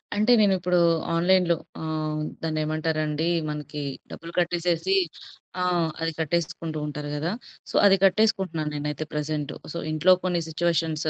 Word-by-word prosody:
అంటే 215 +4 +3
నేను 200 -2 +5
ఇప్పుడు 180 0 +2 0.3
ఆన్‌లైన్‌లో 175 0 +4 0.3
ఆహ్, 155 -1 -2 0.2
దాన్నేమంటారండి 155 0 -1 0.2
మనకి 150 0 -5 0.3
డబ్బులు 165 +1 -8
కట్టేసేసి 175 +1 +1 0.7
ఆ! - - +2 0.4
అది 165 - 0
కట్టేసుకుంటూ 160 0 -2
ఉంటారు 150 0 -5
గదా! 160 +5 -1 0.4
సో, - - -7
అది 195 -1 +7
కట్టేసుకుంటున్నాను 190 -6 +2
నేనైతే 150 +1 -3
ప్రెజెంటు. 150 -1 -3 0.2
సో, 170 - -5
ఇంట్లో 155 +4 +4
కొన్ని 180 -2 +1
సిట్యుయేషన్స్, 160 -1 0
160 Hz, 125 wpm, -25 LUFS, 155-175 Hz, 0.7 s, అది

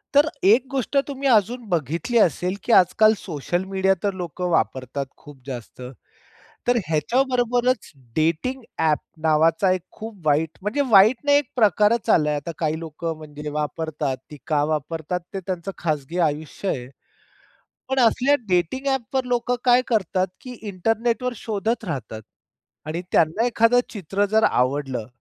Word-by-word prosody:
तर 290 +2 +6 0.2
एक 225 +7 +5
गोष्ट 275 +1 -1
तुम्ही 275 -1 -3
अजून 235 +2 +2
बघितली 170 - -1
असेल, 180 0 +2
की - - -1
आज-काल 215 +4 +5
सोशल 175 +1 -3
मीडिया 190 0 +2
तर 200 -1 0
लोकं 180 +1 -4
वापरतात 135 -4 -1
खूप 145 -2 -14
जास्त. 125 -2 -8 0.9
तर 245 0 +4
ह्याच्याबरोबरच 245 - +1 0.2
डेटिंग 165 +12 0 0.2
ॲप 155 -2 +2 0.2
नावाचा 165 +4 +3
एक 185 -1 0
खूप 220 -1 -9
वाईट 155 +2 +2
म्हणजे 210 +9 -1
वाईट 215 +3 +7
नाही, 285 0 +5
एक 290 -4 -1
प्रकारच 215 -1 +3
आलाय 150 -1 +3
आता. 145 +3 -4
काही 155 -1 -1
लोकं 165 0 -5
म्हणजे 150 -1 -8
वापरतात, 150 -2 -3
ती 150 - -9
का 150 -2 +2
वापरतात? 160 +3 -3
ते 195 - -2
त्यांचं 185 0 -4
खाजगी 155 0 -2
आयुष्य 150 +6 -5
आहे. 125 -6 -3 1.0
पण 265 - 0
असल्या 255 +4 +4
डेटिंग 180 - 0
ॲप 265 -3 -2
वर 260 -1 +1
लोकं 245 0 0
काय 250 0 +5
करतात? 190 -4 +1
की 255 - -9
इंटरनेट 225 +5 -1
वर 250 - -1
शोधत 220 +2 -2
राहतात 115 - -5 0.6
आणि 165 +3 -3
त्यांना 170 +9 +3
एखादं 240 0 +4
चित्र 200 0 -1
जर 220 +1 +3
आवडलं, 130 -2 0
185 Hz, 150 wpm, -23 LUFS, 155-235 Hz, 1.0 s, वाईट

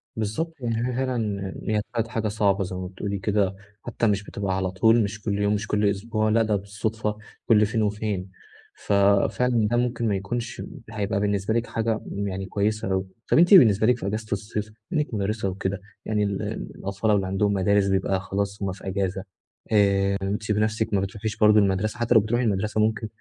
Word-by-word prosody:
بالضبط، 110 +10 -2
يعني 115 0 -1
هي - - -2
فعلًا 110 -7 -2
هي 105 -1 +1
بقت 115 -1 0
حاجة 115 -2 -2
صعبة 100 -2 +1
زي 90 0 -5
ما 90 0 -4
بتقولي 100 +2 -4
كده، 100 -1 +1 0.3
حتى 115 -1 -1
مش 100 0 +1
بتبقى 100 -2 -3
على 95 -1 -1
طول 110 +4 +4
مش 105 +1 -4
كل 100 -1 -1
يوم 105 0 +2
مش 105 +1 -2
كل 105 0 +1
أسبوع 110 +2 -1
لأ، 115 +1 +3
ده 105 -1 +1
بالصُدفة 105 +2 -3 0.3
كل 105 -2 +5
فين 110 +1 -1
وفين، 105 -3 -2 0.4
ففعلًا 105 +3 +2
ده 120 +2 +1
ممكن 120 -1 0
ما 100 - +1
يكونش 115 +5 -4 0.3
هيبقى 105 -2 -1
بالنسبة 100 +1 0
لكِ 115 +1 0
حاجة 115 -1 -1
يعني 95 -1 -3
كويسة 105 0 -1
أوي، 95 0 0 0.3
طب - - +5
أنتِ 175 +4 +6
بالنسبة 110 - +7
لكِ 125 - +4
في 100 - -5
إجازة 110 +2 -3
الصيف 105 +1 -2 0.3
بما 155 -4 +2
إنِّك 145 - -5
مُدَرِّسة 105 0 -1
وكده، 95 +1 -3 0.2
يعني 105 -1 0
ال 100 -1 -1 0.3
الأطفال 100 +3 -1
اللي 95 -2 +2
عندهمُ 100 +2 +1
مدارس 100 +1 +3
بيبقى 95 0 +1
خلاص 100 +2 -3
هُم 95 - -1
في 95 +1 -9
إجازة 95 0 -2 0.5
آآ، 100 -2 +4 0.3
أنتِ 105 +2 -2
بنفسِك 110 +1 0
ما 100 - +3
بتروحيش 105 +2 -4
برضه 105 0 +6
المَدرسة، 100 +3 0
حتى 120 0 +2
لو 110 - +8
بتروحي 120 +4 0
المَدرسة 105 0 0
ممكن 110 +1 0
105 Hz, 195 wpm, -25 LUFS, 100-110 Hz, 0.5 s, لو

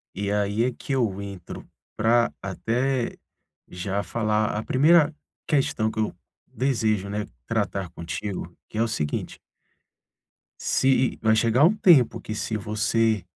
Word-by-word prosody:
E 100 +1 -2
aí 105 +2 +1
é 125 - +1
que 135 - -5
eu 110 -7 0
entro 100 -3 -8 0.3
pra 115 +2 +3
até 120 +6 -1 0.5
já 95 +3 -3
falar 110 -2 0
a 110 - -2
primeira 155 +5 +4 0.3
questão 135 -7 +1
que 110 - -5
eu 110 - 0 0.3
desejo, 110 -7 0
né, 105 +1 -2 0.2
tratar 100 -3 -2
contigo, 85 +2 -5 0.2
que - - -9
é - - +2
o - - 0
seguinte. 75 -10 -3 1.2
Se 130 - +1
e 130 -1 +2
vai 110 0 +4
chegar 115 +4 +3
um 195 +6 +4
tempo 160 - +5
que 110 - -6
se 110 0 -2
você 110 0 +1
110 Hz, 145 wpm, -25 LUFS, 100-120 Hz, 1.2 s, tempo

